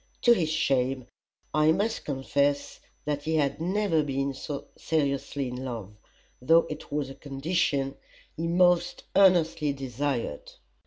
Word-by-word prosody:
To 240 - +7
his 170 -8 0
shame 135 -4 +1 0.5
I 155 +1 +4
must 215 +7 -1
confess 140 0 0 0.3
that 145 -1 -1
he 160 0 0
had 145 0 0
never 185 -2 +1
been 140 -1 -1 0.4
seriously 140 -3 -1
in 125 0 -5
love, 115 -6 -6 0.5
though 165 +6 +5
it 150 - -8
was 145 -2 -2
a - - -7
condition 140 -1 -1 0.4
he 165 +1 -2
most 175 0 +3
earnestly 165 -6 +4
desired. 135 - -3
145 Hz, 125 wpm, -27 LUFS, 135-165 Hz, 0.5 s, To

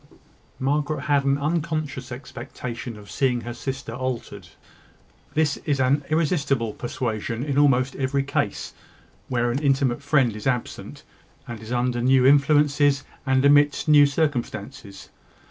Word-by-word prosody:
Margaret 145 +3 -1
had 140 -2 +1
an 140 0 +2
unconscious 150 -3 -2
expectation 120 -2 -7
of 105 -1 -13
seeing 125 -3 0
her 120 0 -6
sister 130 -1 -5
altered. 130 -1 -5 0.9
This 150 -2 +1
is 145 -3 -2
an 135 +3 +2
irresistible 140 - 0
persuasion 115 -1 -3
in 140 -1 -2
almost 135 -2 +3
every 135 +1 0
case 140 +1 -2 0.6
where 120 -1 0
an 125 - -1
intimate 135 -3 +1
friend 140 -6 +2
is 110 - -5
absent, 125 -3 -3 0.4
and 120 -2 -7
is 110 +2 -10
under 120 0 0
new 130 +1 +4
influences, 145 0 +4 0.2
and 130 +1 +3
amidst 145 +1 +4
new 145 -1 +7
circumstances. 120 -9 -3
135 Hz, 130 wpm, -24 LUFS, 120-145 Hz, 0.9 s, new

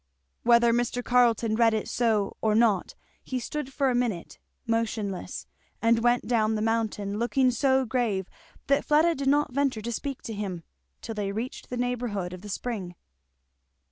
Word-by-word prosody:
'" 65 - -49
Whether 235 0 +5
Mr. 240 +1 0
Carleton 235 -2 +3
read 225 -1 +4
it 215 - -2
so 220 -4 +1
or 215 -1 +2
not, 220 -4 +2 0.3
he 260 - -3
stood 275 +2 -5
for 270 -1 +1
a - - 0
minute 235 -8 -2 0.3
motionless 225 -4 -2 0.3
and 230 0 +3
went 240 +1 +2
down 220 -2 +2
the 215 - -1
mountain 215 -2 -1
looking 250 +2 +2
so 265 +2 +2
grave 220 -6 -1 0.4
that 280 0 +2
Fleda 315 +3 +4
did 275 -2 -3
not 290 -1 +2
venture 265 -5 0
to 235 - -3
speak 275 +3 -4
to 225 - -5
him, 195 -5 -4 0.4
till 225 - -4
they 205 -2 -2
reached 225 +5 -5
the 250 - -4
neighbourhood 240 -7 -2
of 180 - -8
the 210 - -9
spring. 195 -5 -4
230 Hz, 170 wpm, -27 LUFS, 210-250 Hz, 0.4 s, Whether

